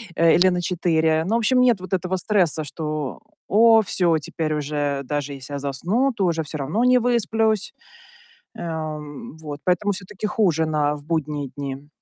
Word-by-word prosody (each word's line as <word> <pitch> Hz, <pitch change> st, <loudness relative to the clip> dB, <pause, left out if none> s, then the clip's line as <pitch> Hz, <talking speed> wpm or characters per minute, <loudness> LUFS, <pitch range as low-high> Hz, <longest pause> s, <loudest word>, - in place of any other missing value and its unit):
э, 165 Hz, -1 st, +5 dB
или 180 Hz, +2 st, +5 dB
на 180 Hz, -1 st, -1 dB
4. 160 Hz, -3 st, +1 dB
Ну, 225 Hz, -, +1 dB
в -, -, +4 dB
общем, 250 Hz, +3 st, +3 dB
нет 240 Hz, -5 st, +4 dB
вот 185 Hz, +1 st, -8 dB
этого 185 Hz, 0 st, 0 dB
стресса, 180 Hz, -6 st, +1 dB
что: 150 Hz, -2 st, -4 dB, 0.3 s
"О, 225 Hz, +2 st, +6 dB
всё, 175 Hz, -5 st, +1 dB
теперь 155 Hz, +1 st, -3 dB
уже 145 Hz, -1 st, -1 dB
даже, 145 Hz, +1 st, -3 dB
если 135 Hz, +1 st, -9 dB
я 140 Hz, -, -3 dB
засну, 175 Hz, -, 0 dB
то 195 Hz, -, 0 dB
уже 165 Hz, -2 st, +1 dB
всё 155 Hz, +1 st, -6 dB
равно 150 Hz, -, -1 dB
не 250 Hz, 0 st, +5 dB
высплюсь". 225 Hz, -3 st, +1 dB, 0.8 s
Э, -, -, -10 dB
м, 155 Hz, -2 st, -6 dB
вот, 150 Hz, -2 st, -7 dB
поэтому 200 Hz, +3 st, +1 dB
всё-таки 195 Hz, +2 st, -5 dB
хуже 170 Hz, -7 st, +1 dB
на 150 Hz, -1 st, +1 dB
в 145 Hz, -, -13 dB
будние 150 Hz, -4 st, -2 dB
дни. 140 Hz, 0 st, -6 dB
160 Hz, 180 wpm, -22 LUFS, 150-200 Hz, 0.8 s, О